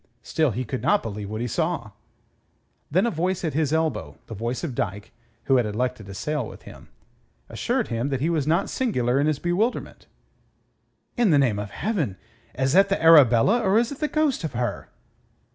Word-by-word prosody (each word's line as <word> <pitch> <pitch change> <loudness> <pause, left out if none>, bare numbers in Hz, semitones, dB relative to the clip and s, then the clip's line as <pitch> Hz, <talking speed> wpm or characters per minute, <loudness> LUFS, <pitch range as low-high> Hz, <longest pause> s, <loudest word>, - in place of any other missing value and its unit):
Still 155 -2 +1
he 125 +3 -3
could 130 +3 -4
not 205 - +2
believe 105 -2 -5
what 110 +2 -3
it 120 - -3
saw. 165 -2 -1
And 110 - -14 1.0
then 185 +8 +2
a 235 - +1
voice 180 +2 -1
at 155 - -2
his 150 -1 0
elbow 160 0 -1
the 115 - -9
voice 115 +3 -4
of 155 -7 -3
Dyke, 100 -2 -4 0.3
who 135 - +3
had 120 - +2
elected 115 0 -3
to 100 - -8
sail 150 0 -2
with - - -12
him - - -13 0.6
assured - - -1
him 115 +4 -2
that 135 -2 -1
he 150 - 0
was 160 -4 0
not 170 +5 +2
singular 130 - 0
in 145 - +1
his 155 -2 +1
bewilderment. 180 - -2 1.1
"In 240 -4 +3
the 150 - +5
name 120 -7 +2
of 105 0 -5
Heaven, 145 - -2 0.4
is 130 +1 +1
that 195 +2 +5
the 195 - 0
Arabella 160 - +6
or 200 -1 +3
is 235 +2 +1
it 280 - -7
the 305 - 0
ghost 305 - 0
of 160 - -4
her?" 120 0 -3
145 Hz, 200 wpm, -24 LUFS, 120-180 Hz, 1.1 s, Arabella